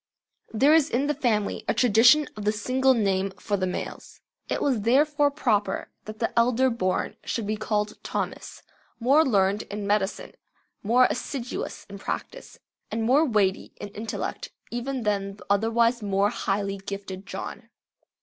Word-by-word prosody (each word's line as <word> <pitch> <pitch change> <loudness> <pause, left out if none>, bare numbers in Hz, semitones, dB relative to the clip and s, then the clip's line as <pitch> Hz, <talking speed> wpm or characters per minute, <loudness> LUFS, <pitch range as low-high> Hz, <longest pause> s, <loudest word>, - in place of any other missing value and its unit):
There 270 +7 +4
is 315 -2 +4
in 260 +4 +1
the 295 - +1
family 215 -7 0
a - - +1
tradition 245 +6 +5
of 210 - -6
the 210 - +2
single 255 +5 +2
name 195 -3 +1
for 205 - -1
the 185 -1 -1
males. 180 - -6 0.3
It - - -1
was 255 -7 +1
therefore 290 +6 +3
proper 215 -9 -1
that 215 0 -8
the 230 - -2
elder 250 +2 +3
born 185 -5 -1
should 230 - -3
be 215 +1 -1
called 210 0 -2
Thomas, - - -5 0.4
more 275 +7 +5
learned 200 -5 +2
in 205 0 -4
medicine, 200 -1 -1 0.5
more 240 +4 +4
assiduous 275 - -5
in - - -9
practice, - - -6 0.3
and 225 +1 -2
more 265 +7 +4
weighty 210 -9 0
in 205 - -6
intellect 215 +2 -5 0.2
even 250 +1 -3
than 200 -2 -1
the - - -15
otherwise 230 +3 +2
more 200 0 +1
highly 200 0 -2
gifted 195 0 -7
John. - - -7
220 Hz, 155 wpm, -26 LUFS, 200-255 Hz, 0.5 s, tradition